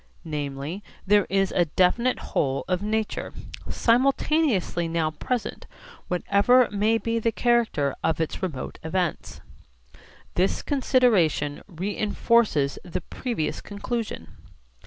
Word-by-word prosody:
Namely, 150 +4 -4 0.2
there 205 0 +4
is 195 0 +1
a 175 - +2
definite 185 +10 +2 0.2
whole 135 -1 0
of 180 0 0
nature, 215 +1 -2 0.4
simultaneously 250 - +2
now 165 -1 0
present, 240 +9 -4 0.4
whatever 200 +7 +4
may 210 +2 +2
be 230 0 -1
the 230 0 +1
character 225 - +1
of 160 -1 +1
its 160 - -2
remote 155 -9 -4
events. 175 +1 -2 0.9
This 185 +2 +1
consideration 220 - +2
reinforces 205 - +1
the 180 -1 -4
previous 225 -3 -3
conclusion. 210 - -4
195 Hz, 105 wpm, -25 LUFS, 160-230 Hz, 0.9 s, there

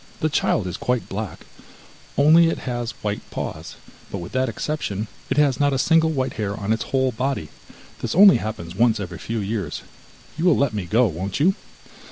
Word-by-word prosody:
The 155 - +1
child 125 -8 +1
is 90 - -4
quite 125 -1 -1
black, 105 -3 -6 0.7
only 160 +4 +6
it - - -2
has 120 -2 -3
white 105 0 -2
paws, - - -6 0.3
but - - -4
with 85 -1 -7
that 130 -1 0
exception, 110 -5 -3 0.2
it - - -1
has 140 -4 +3
not 145 -1 +3
a - - +1
single 160 +3 +4
white 135 -4 -1
hair 100 -1 -2
on 105 +2 0
its 110 - -2
whole 130 -1 +1
body; 125 - -2 0.5
this - - -2
only 195 +1 +8
happens 85 -6 -5
once 115 +2 +3
every 90 -4 -6
few 115 - -4
years, 100 -6 -3 0.6
you 170 - 0
will 175 -5 +5
let 140 -5 +1
me 100 -4 -3
go, 115 +8 +4
won't 95 - -3
you? 180 +7 +4
120 Hz, 195 wpm, -22 LUFS, 100-140 Hz, 0.7 s, only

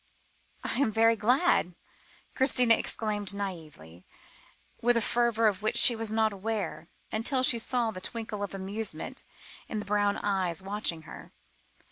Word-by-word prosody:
"I - - -3
am 275 -6 +2
very 225 +1 +4
glad," 240 - +2 0.6
Christina 250 -3 +5
exclaimed 210 -3 -1
naïvely, 155 - -8 0.8
with 245 0 +3
a - - +4
fervour 235 0 +1
of 205 -2 +1
which 215 - -1
she 240 - +7
was 225 -1 -4
not 220 -1 +1
aware, 200 -4 -4 0.2
until 255 +4 0
she 235 -2 +3
saw 235 -1 0
the 185 - -9
twinkle 220 -1 -4
of 200 -1 -4
amusement 200 +3 -4 0.4
in 220 - -5
the 210 - -4
brown 205 0 +1
eyes 190 -4 -1
watching 195 -5 -3
her. - - -12
215 Hz, 145 wpm, -28 LUFS, 195-230 Hz, 0.8 s, she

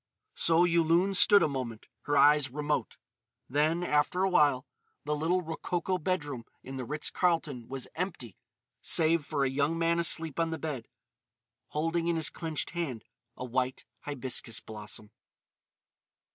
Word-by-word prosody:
So 165 +1 +3
Yulun 170 +2 +3
stood 205 +2 +7
a - - +3
moment, 125 -6 -5 0.2
her 145 0 +1
eyes 150 -1 +5
remote. 150 +3 -2 0.5
Then, 155 +6 +1
after 160 +3 +1
a 195 - +3
while, 145 -7 +3 0.4
the 150 +1 -1
little 170 +5 0
rococo 175 +3 -2
bedroom 145 -8 -2 0.2
in 135 +1 -7
the 130 - -4
Ritz 150 +4 -1
Carlton 165 -9 0
was 135 -1 -5
empty 160 - -4 0.5
save 165 -1 +3
for 140 -3 0
a - - +2
young 145 +4 0
man 170 0 +1
asleep 165 -2 +1
on 165 0 +1
the 160 - -3
bed, 145 -6 -5 0.8
holding 165 +2 -1
in 170 - +1
his 160 -1 +2
clenched 160 -3 -4
hand 150 -11 -4 0.3
a 125 - -5
white 125 +1 -2
hibiscus 130 -5 -4
blossom. 105 -1 -9
150 Hz, 145 wpm, -30 LUFS, 135-170 Hz, 0.8 s, stood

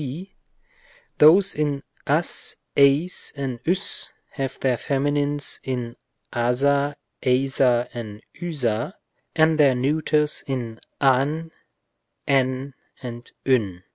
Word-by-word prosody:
c. 160 +8 -7 0.9
Those 180 +6 +7
in 145 -2 -1 0.2
as, - - 0 0.2
εἰς 140 +6 +3
and 135 -4 -4
vs 180 +3 +1 0.2
have 135 -1 -4
their 130 -2 +1
feminines 145 +1 0
in 125 -3 -4 0.4
aca 140 +4 +1 0.3
εἰσα 125 -1 +2
and 110 -3 -7
voa 145 - -2 0.4
and 160 0 +3
their 140 -3 +5
neuters 150 +3 +1
in 120 -4 -4 0.2
av, 145 +5 +2 0.8
ev 135 0 +1 0.3
and 120 -1 -8
vv. 105 -9 +1
135 Hz, 100 wpm, -23 LUFS, 125-150 Hz, 0.9 s, Those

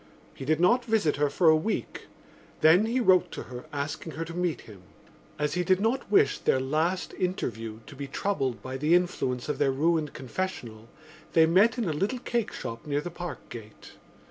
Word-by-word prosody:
He 135 - -8
did 155 +2 +1
not 240 +8 +4
visit 220 - +1
her 145 0 +2
for 165 +4 +2
a 155 - +8
week, 160 +8 -3 0.5
then 170 +8 +6
he 240 +3 0
wrote 185 -6 +4
to - - -5
her 125 -1 -9
asking 145 +2 -4
her 165 +4 -4
to 165 - -8
meet 175 -2 -1
him. 100 -4 -14 0.6
As 150 -1 -1
he 180 - 0
did 185 +1 +3
not 230 +4 0
wish 205 - +4
their 130 - +2
last 155 +7 -1
interview 115 - -3
to 145 - -12
be 140 +1 -6
troubled 135 -5 -2
by 130 0 -5
the 150 +5 +3
influence 135 -9 0
of 150 -2 -2
their 145 -2 +3
ruined 155 +2 +1
confessional 120 -6 -5 0.4
they 160 -1 +6
met 195 +9 +4
in 235 - -1
a 160 - 0
little 200 - -1
cakeshop 210 - -4
near 145 0 0
the 175 +3 -6
Parkgate. 120 -11 -9
160 Hz, 190 wpm, -27 LUFS, 135-185 Hz, 0.6 s, a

